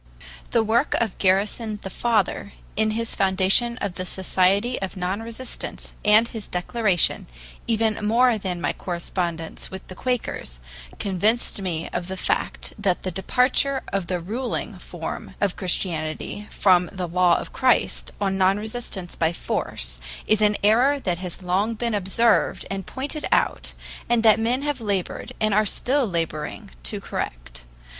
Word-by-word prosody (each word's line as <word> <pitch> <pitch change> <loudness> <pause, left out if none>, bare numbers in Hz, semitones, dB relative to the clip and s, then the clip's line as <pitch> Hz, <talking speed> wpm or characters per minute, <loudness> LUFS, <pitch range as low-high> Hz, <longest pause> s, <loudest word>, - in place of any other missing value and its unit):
The 230 - +3
work 230 +6 +2
of 220 -5 -1
Garrison, 210 +3 +2
the 190 - -5
father, 215 -3 0 0.2
in 220 +1 +2
his 230 0 -2
foundation 195 +5 +3
of 200 -3 -1
the 185 - -4
Society 195 +6 +2
of 190 0 -4
Non 185 +4 -1
resistants 230 +3 -6
and 215 +2 +6
his 225 -3 -6
Declaration, 185 0 +1 0.4
even 220 -2 +1
more 230 +2 +4
than 185 -3 -3
my - - 0
correspondence 170 -2 -4
with 190 0 -9
the - - -6
Quakers, 225 - -3 0.4
convinced 205 +3 +1
me 170 -4 -2
of 175 0 -2
the 190 0 -4
fact - - -1
that 195 -3 +1
the 185 - -2
departure 255 +7 +2
of 195 -3 0
the 180 -1 -1
ruling 225 +9 -3
form - - -6
of 200 -3 +1
Christianity 175 +1 -2
from 180 -3 +4
the 185 -2 -4
law 175 0 +4
of - - -6
Christ 255 -2 +2
on 195 -1 0
non 190 +1 +4
resistance 215 -4 -5
by 160 0 +2
force - - -3 0.3
is 215 0 +3
an 210 -1 +4
error 250 +7 +4
that 180 -8 -1
has 185 0 -5
long 195 +6 +1
been 235 +1 -1
observed 205 +3 +2
and 195 -1 -4
pointed 290 +3 -3
out, - - +1 0.4
and 235 -1 +3
that 220 -1 +6
men 245 +4 +1
have 290 -4 -1
labored, 200 -4 -2
and 215 -2 +2
are 215 +2 +5
still 255 +5 +1
laboring, 165 - -3
to - - -3
correct. - - -5
200 Hz, 155 wpm, -24 LUFS, 180-230 Hz, 0.4 s, and